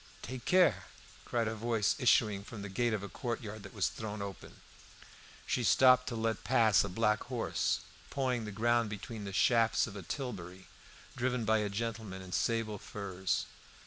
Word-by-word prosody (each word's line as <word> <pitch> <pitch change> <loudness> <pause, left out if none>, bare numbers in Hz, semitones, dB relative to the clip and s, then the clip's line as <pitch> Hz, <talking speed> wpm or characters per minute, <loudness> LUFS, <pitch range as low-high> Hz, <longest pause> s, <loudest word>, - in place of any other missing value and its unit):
"Take 130 0 -6
care!" 185 -1 +4 0.4
cried 115 -2 0
a 110 - -1
voice 110 -1 +1
issuing 110 -5 +3
from 105 -1 -8
the 100 - -5
gate 120 +5 0
of 105 -2 -2
a - - -4
courtyard 110 0 -5
that - - -11
was 95 -6 +2
thrown 105 -1 -6
open. 100 -2 -8 0.9
She 125 - 0
stopped 125 +2 +6
to 125 - -3
let 115 0 -1
pass 110 -4 +4
a 100 - -3
black 105 +2 +1
horse, 125 -3 -1 0.3
pawing 130 -4 -1
the 105 - -5
ground 115 +2 +2
between 105 +1 -6
the 100 - -5
shafts 115 +2 +3
of 110 - -9
a 100 - -6
tilbury, 95 - -6 0.5
driven 125 -1 -1
by 110 +1 +3
a 105 -1 -1
gentleman 105 -2 -4
in 95 - -10
sable 110 0 0
furs. 95 -3 -2
110 Hz, 175 wpm, -33 LUFS, 100-120 Hz, 0.9 s, stopped